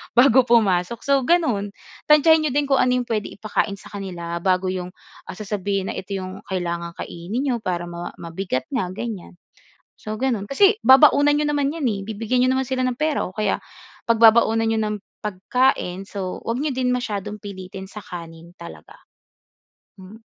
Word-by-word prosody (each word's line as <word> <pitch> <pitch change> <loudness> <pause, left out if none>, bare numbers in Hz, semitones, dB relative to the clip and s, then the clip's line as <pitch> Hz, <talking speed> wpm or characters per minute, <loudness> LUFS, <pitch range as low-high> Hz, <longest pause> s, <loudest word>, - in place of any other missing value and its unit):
bago 250 0 +6
pumasok. 215 -2 +2
So 280 -1 +3
gano'n 230 -13 +1 0.3
tantsahin 310 +1 +5
n'yo 275 - -3
din 290 - +3
kung 275 -1 +3
ano 250 - +3
'yong 250 - 0
puwede 215 -2 -1
ipakain 210 0 -2
sa - - -13
kanila 175 -4 -5
bago 185 0 +1
'yong, 180 -1 -4 0.4
ah, - - -4
sasabihin 200 -1 -3
na - - -4
ito 190 - -8
'yong 190 +1 -6
kailangang 170 -2 -3
kainin 180 +9 -4
n'yo 265 -4 0
para 175 -1 -2
ma 175 0 -6
mabigat 170 -5 -3
nga 235 -10 -2
ganyan. 210 -3 -6 0.6
So, 215 - -6
gano'n 230 -3 -1
kasi 395 - +4
babaunan 285 +2 +7
n'yo 300 0 0
naman 285 -1 +1
'yan 330 - -6
eh, 205 -3 -2
bibigyan 225 +4 0
n'yo - - +2
naman 265 0 -1
sila 260 0 -1
ng 250 -1 -1
pera 305 -1 0
o 185 - -8
kaya 215 +1 0 0.5
pagbabaunan 225 0 +5
n'yo 225 0 +1
ng 210 0 -1 0.3
pagkain. 195 -1 0
So 190 -2 -5
'wag 230 +2 -2
n'yo 305 - 0
din 255 -1 +1
masyadong 210 -4 -3
pilitin 190 -1 -8
sa 210 +1 -10
kanin 170 -1 -10
talaga, 170 0 -12 1.0
Mm. 190 +4 -12
210 Hz, 175 wpm, -22 LUFS, 185-255 Hz, 1.0 s, babaunan